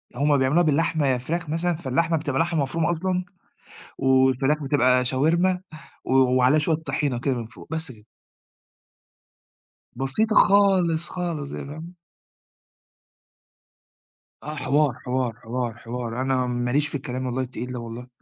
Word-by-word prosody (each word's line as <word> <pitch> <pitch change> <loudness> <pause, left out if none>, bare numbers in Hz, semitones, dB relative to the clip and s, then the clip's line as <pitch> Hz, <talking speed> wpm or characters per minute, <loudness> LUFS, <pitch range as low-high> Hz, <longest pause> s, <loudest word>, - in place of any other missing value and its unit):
هُم 145 +2 +2
بيعملوها 135 +7 +3
بالحمة 160 -1 +1
يا 130 -1 +2
فراخ 165 +5 -4
مثلًا، 170 +2 0
فاللحمة 165 +2 0
بتبقى 145 -3 -2
لحمة 165 -2 0
مفرومة 160 +5 -1
أصلًا، 180 +2 -1 0.7
والفراخ 130 +2 +3
بتبقى 125 -2 +3
شاورما، 170 +8 +2 0.4
و - - -3
وعليها 130 +2 +4
شوية 155 +1 +2
طحينة 145 -5 -2
كده 135 -1 0
من 115 -2 -5
فوق، 115 - -14
بس 160 -4 -2
كده. 105 -2 -18 1.9
بسيطة 175 - +2
خالص، 185 -5 +4
خالص 170 -6 -4
يعني - - -6
فاهمة؟ 160 +4 -9 2.5
آه 150 +1 -5
حوار، 145 -2 +2
حوار، 125 -2 -1
حوار، 120 0 -3
حوار. 120 +1 -5
أنا 130 -1 0
ما 120 0 -2
ليش 145 +2 +2
في - - -6
الكلام 130 -1 -4
والله 130 +1 -2
التقيل 125 0 -6
ده 125 - -5
والله. 115 +2 -8
140 Hz, 140 wpm, -24 LUFS, 125-165 Hz, 2.5 s, وعليها